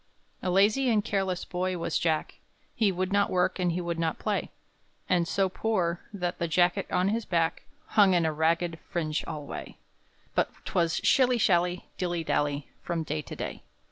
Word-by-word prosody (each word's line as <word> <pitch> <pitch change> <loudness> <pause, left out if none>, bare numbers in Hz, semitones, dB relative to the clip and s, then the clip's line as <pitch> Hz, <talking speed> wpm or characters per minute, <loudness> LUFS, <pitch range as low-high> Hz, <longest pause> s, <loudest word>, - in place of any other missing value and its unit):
A 185 - -1
lazy 210 +8 +4
and 215 -3 +2
careless 190 -3 -1
boy 185 0 -2
was 170 - -1
Jack, 160 -2 -1 0.3
He 215 -4 +2
would 185 +1 -2
not 200 0 +3
work, 180 +1 +1
and 180 -1 +2
he 170 - -1
would 170 -1 -3
not 165 -1 0
play; - - -1 0.6
And 175 -2 +2
so 195 +1 +2
poor, 185 -4 0
that 180 -3 -3
the 170 - 0
jacket 175 +4 +2
on 180 +1 +2
his 225 +2 0
back 165 -4 0 0.2
Hung 200 - +4
in 170 -2 +3
a 160 - +1
ragged 165 +2 +1
fringe 155 -3 -1
alway; 150 -3 -6 0.6
But - - +2 0.2
'twas 170 -2 +1
shilly 255 -2 +4
shally, 180 -3 +2
dilly 175 -2 -1
dally, 145 -2 0
From 170 -2 -2
day 150 0 -2
to - - -9
day. - - -5
175 Hz, 175 wpm, -28 LUFS, 165-195 Hz, 0.6 s, lazy